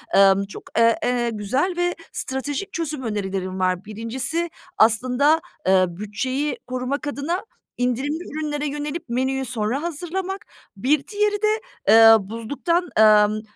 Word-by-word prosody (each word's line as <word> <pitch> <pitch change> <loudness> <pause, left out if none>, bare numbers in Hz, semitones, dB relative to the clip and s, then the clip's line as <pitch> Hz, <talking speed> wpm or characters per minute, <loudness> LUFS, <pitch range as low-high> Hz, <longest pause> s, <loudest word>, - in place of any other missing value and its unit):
Emm, 195 0 +5
çok, 200 - -10
eee, 230 0 +5
eee, 245 -1 +1
güzel 255 - 0
ve 350 0 0 0.2
stratejik 275 +7 -3
çözüm 310 -5 -3
önerilerin 190 -4 -3
var. 185 +1 0
1.si 255 +10 -2 0.3
aslında, 255 +8 +4 0.3
eee, 190 -1 +5
bütçeyi 235 - -3
korumak 255 +4 -3
adına 290 +7 -3 0.3
indirimli 255 +5 -1
ürünlere 300 -2 -3
yönelip 295 +1 -5
menüyü 260 +2 -1
sonra 240 +3 -2
hazırlamak. 360 +4 -4 0.3
Bir 275 +6 +1
diğeri 415 0 0
de, 435 +1 +1 0.3
eee, 225 0 +9
buzluktan, 285 +10 -1
emm, 215 0 +5
260 Hz, 125 wpm, -22 LUFS, 215-310 Hz, 0.3 s, eee